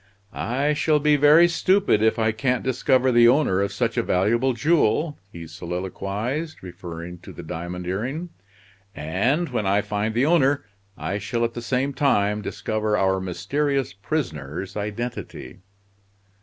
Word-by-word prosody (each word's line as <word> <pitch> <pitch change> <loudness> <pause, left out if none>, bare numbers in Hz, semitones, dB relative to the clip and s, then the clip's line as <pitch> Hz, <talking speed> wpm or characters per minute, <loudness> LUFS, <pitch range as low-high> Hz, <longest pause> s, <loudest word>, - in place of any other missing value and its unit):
"I 140 +6 0
shall 150 +1 +2
be 150 0 +3
very 150 +4 +6
stupid 185 - +2
if 110 0 +3
I 110 -1 +2
can't 125 +3 -1
discover 130 0 +2
the 120 -1 +6
owner 120 -7 +3
of 100 - -1
such - - -1
a - - +4
valuable 115 +8 +1
jewel," 150 +3 +1
he 85 -3 -8
soliloquized, 100 - -4
referring 85 -1 -8
to - - -11
the - - -9
diamond 90 +2 -6
earring. 130 - -3 0.7
"And 125 - 0
when 115 -6 -2
I 100 +2 +3
find 105 +2 -2
the 125 +3 +3
owner 145 -4 +3 0.3
I 100 +2 -3
shall 115 +4 -1
at 115 - -3
the 120 - -5
same 130 +4 -1
time 105 -7 +1
discover 105 0 -2
our 95 -1 +1
mysterious 130 - -1
prisoner's 100 - -4
identity." 105 +4 -5
115 Hz, 145 wpm, -23 LUFS, 95-140 Hz, 0.7 s, very